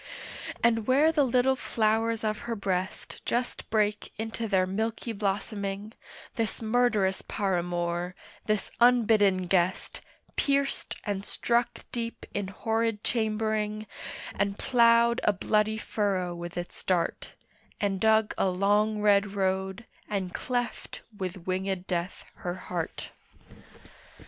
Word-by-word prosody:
And 225 -2 +3
where 285 +5 +5
the 305 -3 +3
little 255 +1 +3
flowers 225 -1 +1
of 215 -1 0
her 230 - 0
breast 190 -2 -3
Just 245 +1 -2
brake 210 -1 +1
into 225 +1 -3
their 190 -3 +3
milky 220 +4 -2
blossoming, 200 0 -2 0.4
This 225 -2 -1
murderous 220 -4 +2
paramour, 175 -2 -1 0.3
this 215 -2 0
unbidden 215 -6 +5
guest, 180 0 0 0.3
Pierced 280 -1 0
and 200 -2 -2
struck 235 +3 0
deep 235 -1 -4
in 200 -1 -2
horrid 225 +2 -1
chambering, 215 -1 0 0.5
And 200 0 -1
ploughed 235 -1 +4
a 210 - +4
bloody 215 +2 +1
furrow 195 -5 -1
with 175 0 -7
its 175 0 -6
dart, 180 -3 0 0.5
And 200 -2 0
dug 220 +1 +4
a - - +3
long 205 +3 +2
red 200 -1 +4
road, 190 +2 -1 0.2
and 190 -3 -2
cleft 245 -1 -3
with 185 -2 -5
wingèd 185 0 -1
death 180 0 -3
her 175 0 -3
heart. 180 -2 -5
210 Hz, 120 wpm, -28 LUFS, 190-225 Hz, 0.5 s, where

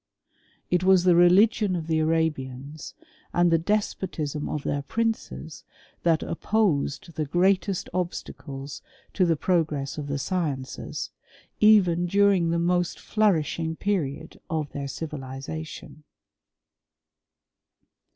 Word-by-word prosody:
It 180 0 +2
was 185 -1 +5
the 180 -1 +5
religion 185 +3 +5
of 165 -2 -3
the 160 -1 +1
Arabians, 150 -3 -2 0.4
and 175 0 +3
the 165 - +4
despotism 165 -6 -2
^—nC 150 - -3
their 145 - -1
princes, 220 - -3 0.4
that 165 -2 +2
opposed 170 -5 0
the 155 - -2
greatest 185 +4 +1
obstacles 145 -6 -5 0.3
HBft>the 175 -4 +3
progress 155 -5 0
of 145 - -5
the 145 0 -2
sciences, 145 -5 -3 0.5
even 180 -5 +5
during 195 -2 +3
the 170 - +1
most 175 +1 +1
^Hnniishing 165 -6 0
period 160 -6 -2
of 155 -3 -2
their 140 -1 -4
civilization." 150 +2 -7
165 Hz, 105 wpm, -26 LUFS, 145-185 Hz, 0.5 s, was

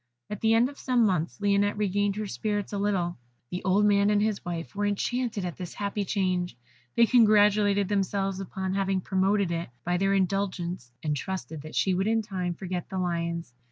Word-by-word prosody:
At 210 - -5
the 225 0 +4
end 235 +2 +4
of 280 +1 -11
some 245 -3 +2
months, 180 -4 0
Lionette 205 0 +2
regained 205 -1 +1
her 215 0 -3
spirits 205 0 -3
a 200 - -1
little. 185 -6 0 0.3
The 180 - -4
old 195 +2 +3
man 200 0 +4
and 210 -1 +3
his 210 -1 0
wife 170 -1 -5
were 205 0 0
enchanted 220 0 -1
at 175 - -5
this 180 -2 -7
happy 200 0 -2
change. 185 - -1 0.4
They 235 - +6
congratulated 210 -4 +4
themselves 195 -1 0
upon 190 0 -3
having 195 -1 0
promoted 195 0 +1
it 170 -3 -3
by 175 +4 0
their 195 +2 +2
indulgence, 185 -7 -1
and 150 -2 0
trusted 160 -1 -5
that 155 +1 -9
she 190 - +2
would 190 +3 0
in 225 0 +2
time 180 -4 -3
forget 180 0 -5
the 190 - -4
Lions. 170 -4 -2
195 Hz, 190 wpm, -27 LUFS, 180-205 Hz, 0.4 s, They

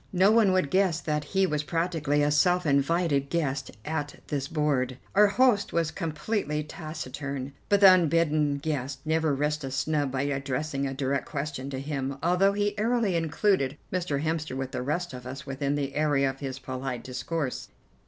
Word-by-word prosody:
No 190 +3 +5
one 220 -3 +5
would 185 -6 +1
guess 185 -4 +2
that 150 -2 -1
he 195 +4 +2
was 150 -5 0
practically 155 -2 0
a 145 - +2
self 180 +4 +3
invited 140 0 +2
guest 140 -5 -1 0.2
at 150 -2 -3
this 140 -3 -2
board. 135 -5 0 0.2
Our 210 +1 +6
host 220 -1 +3
was 165 -1 +1
completely 155 -1 -2
taciturn, 140 -3 -6 0.2
but 200 0 +4
the 190 -2 +10
unbidden 155 -4 +2
guest 140 -2 -3
never 160 -2 +1
risked 150 +1 -1
a 135 - -3
snub 145 +1 0
by 135 +1 -1
addressing 140 +1 -2
a 135 - -3
direct 135 0 -1
question 140 -2 -4
to 135 -1 -4
him, 135 -1 -3
although 180 +4 +3
he 205 0 0
airily 225 -4 +1
included 160 -3 +1 0.2
Mr. 160 -6 -1
Hemster 155 -4 -2
with 135 -1 -4
the - - -3
rest 160 +5 -2
of 125 0 -8
us 135 +2 -7
within 140 +1 -2
the 140 -1 -2
area 145 -2 +2
of 135 - -15
his 135 -2 -4
polite 130 -2 -5
discourse. 130 +2 -3
150 Hz, 175 wpm, -27 LUFS, 135-170 Hz, 0.2 s, the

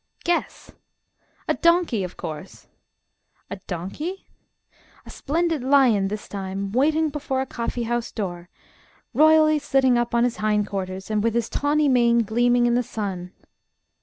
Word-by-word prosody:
Guess! 345 0 -2 0.8
"A - - +2
donkey, 335 - +2
of 180 - -7
course!" 160 +4 -8 0.9
A 200 - -4
donkey? 200 - -5 0.8
A - - -11
splendid 325 0 -1
lion 255 -7 +4
this 210 +1 -6
time, 195 0 -5
waiting 310 +6 +2
before 280 -2 -3
a 265 - -1
coffee 240 -1 -4
house 240 0 -2
door, 175 -5 -5 0.6
royally 310 +2 +5
sitting 270 -4 +2
up 240 0 -1
on 235 - +3
his 245 -1 0
hind 210 -1 +1
quarters, 190 0 -5
with 215 +2 0
his 235 -1 0
tawny 295 +1 +1
mane 235 -3 +3
gleaming 240 +3 +2
in 240 - +2
the 245 - +2
sun. 195 -6 -5
240 Hz, 140 wpm, -23 LUFS, 200-285 Hz, 0.9 s, royally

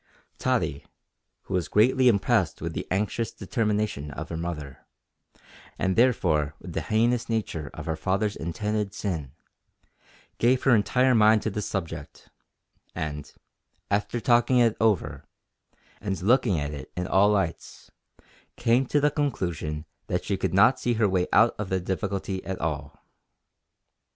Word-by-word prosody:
Tottie, 70 0 0 0.6
who - - -7
was 90 -3 0
greatly 125 +4 +4
impressed 100 -5 +2
with - - -4
the - - -5
anxious 105 +4 -1
determination 105 - -2
of 75 +3 -7
her 85 - -4
mother, 80 -5 -6 0.9
and 95 -1 0
therefore 80 - +2
with - - -9
the - - -1
heinous 115 +2 +1
nature 90 -10 -2
of - - -7
her 80 - -1
father's 100 +4 -1
intended 105 +4 -3
sin, 80 -11 -4 1.1
gave 125 +2 +3
her 135 - +5
entire 125 +4 +3
mind 110 -1 +5
to 110 - -1
this 105 +1 -3
subject, 80 -6 -6 0.7
and, 75 -2 -5 0.6
after 105 +4 0
talking 120 +2 +3
it 115 -3 +4
over, 75 -10 +1 0.8
and 95 -3 -3
looking 115 - +3
at 75 +1 -3
it 70 -3 -8
in 90 - -1
all 95 +2 +4
lights, 95 -6 -2 0.6
came 120 +3 +2
to 145 - +2
the 145 +1 +2
conclusion 85 - -2 0.2
that 90 - -2
she 100 - 0
could 95 - -2
not 110 +7 +5
see 120 - 0
her 110 -1 +3
way 95 -2 +1
out 115 +3 +5
of 105 -3 -3
the 95 - 0
difficulty 95 +1 -3
at 95 -1 -5
all. - - -4
100 Hz, 145 wpm, -26 LUFS, 85-115 Hz, 1.1 s, her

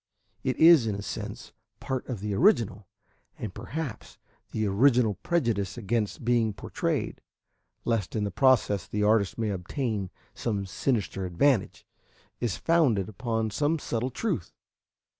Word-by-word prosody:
It 130 -2 -1
is, 160 -7 +7
in 105 - -1
a 100 - -5
sense, - - -6 0.3
part 130 -1 -3
of 115 -7 -4
the 105 0 -2
original, 110 - +2 0.5
and 105 -4 -5
perhaps 145 -8 -6 0.3
the 110 -1 0
oriental 115 +2 +4
prejudice 115 - 0
against 110 0 -2
being 115 -3 +2
portrayed, - - -3 0.6
lest 115 -5 -1
in 105 - 0
the 100 - -2
process 110 -5 +3
the 105 0 -1
artist 105 -2 +2
may 110 -2 0
obtain 100 +1 -3 0.2
some 100 -4 -2
sinister 100 -1 -1
advantage, 105 +5 +1 0.5
is 115 -6 -1
founded 135 - +2
upon 110 0 -2
some 150 +8 +1
subtle 120 -3 -2
truth. 130 - -2
110 Hz, 135 wpm, -28 LUFS, 100-130 Hz, 0.6 s, is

